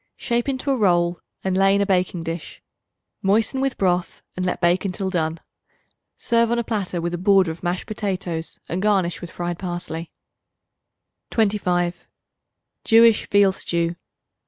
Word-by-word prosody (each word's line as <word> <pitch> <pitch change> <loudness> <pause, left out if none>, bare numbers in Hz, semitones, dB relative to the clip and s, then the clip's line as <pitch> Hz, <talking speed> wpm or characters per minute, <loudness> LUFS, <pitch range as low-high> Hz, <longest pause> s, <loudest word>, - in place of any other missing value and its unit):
Shape 240 +1 -1
into 275 +1 -1
a - - +3
roll 175 -5 +2 0.2
and 190 -1 0
lay 195 +1 +4
in 200 - +2
a - - +2
baking 180 -3 0
dish; 165 0 -6 0.6
moisten 220 +6 +1
with 270 -1 -1
broth 180 -2 0
and 185 - -3
let 180 0 -1
bake 175 +1 +2
until 190 0 -2
done. 165 -2 -1 0.8
Serve 235 -1 +2
on 235 - +1
a 235 - 0
platter 200 -6 -2
with 170 +1 -2
a 175 - -3
border 190 -2 +4
of 160 - -10
mashed 180 +1 -2
potatoes 185 -6 -3
and 180 +2 -2
garnish 195 -4 +1
with 175 - -7
fried 175 0 -4
parsley. 175 -2 -5 1.2
25. 180 -5 0 0.8
Jewish 225 -1 +5
Veal 200 -1 +5
Stew. 170 -2 -1
185 Hz, 155 wpm, -22 LUFS, 175-210 Hz, 1.2 s, Jewish